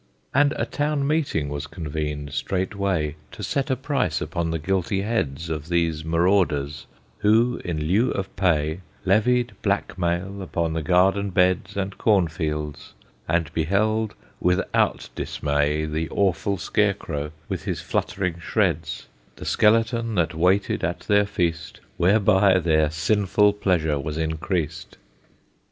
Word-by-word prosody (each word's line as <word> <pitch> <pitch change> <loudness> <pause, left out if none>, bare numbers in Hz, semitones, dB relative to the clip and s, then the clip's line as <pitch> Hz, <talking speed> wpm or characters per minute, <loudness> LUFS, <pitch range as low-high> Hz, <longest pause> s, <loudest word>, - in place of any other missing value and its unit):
And 145 +2 +4
a - - -1
town 145 -1 -1
meeting 140 - 0
was 70 +1 -4
convened 75 -3 -4
straightway 95 -2 -1 0.2
To - - -8
set 140 +1 -1
a 130 - +2
price 130 - -1
upon 85 -2 -2
the 80 - -1
guilty 95 +4 -1
heads 85 -8 -2
Of 80 0 -4
these 85 -2 0
marauders, 80 -4 +1 0.3
who, 115 +4 +3
in 80 -4 -2
lieu 105 +10 +2
of 95 -1 -4
pay, 80 -3 +1 0.3
Levied 120 +5 +3
black 100 -2 -1
mail 90 +3 -1
upon 85 -3 -2
the 80 - -1
garden 95 +4 +3
beds 90 +1 +1
And 95 0 -3
corn 100 -6 +3
fields, 75 -2 -4 0.3
and 80 0 0
beheld 105 +6 +1 0.2
without 90 0 +1
dismay 75 +1 0
The 80 +1 -2
awful 100 0 0
scarecrow, 85 -6 -1 0.2
with - - -4
his - - -2
fluttering 90 -3 -2
shreds; 80 -1 -1 0.3
The - - -9
skeleton 115 +1 +2
that 85 -2 +1
waited 90 +5 +1
at 85 +2 -1
their 105 -1 +3
feast, 85 -5 -2 0.2
Whereby 95 0 +4
their 80 -3 +2
sinful 100 +5 +2
pleasure 80 -7 +1
was 75 +2 -4
increased. 80 +1 -3
90 Hz, 135 wpm, -24 LUFS, 80-100 Hz, 0.3 s, And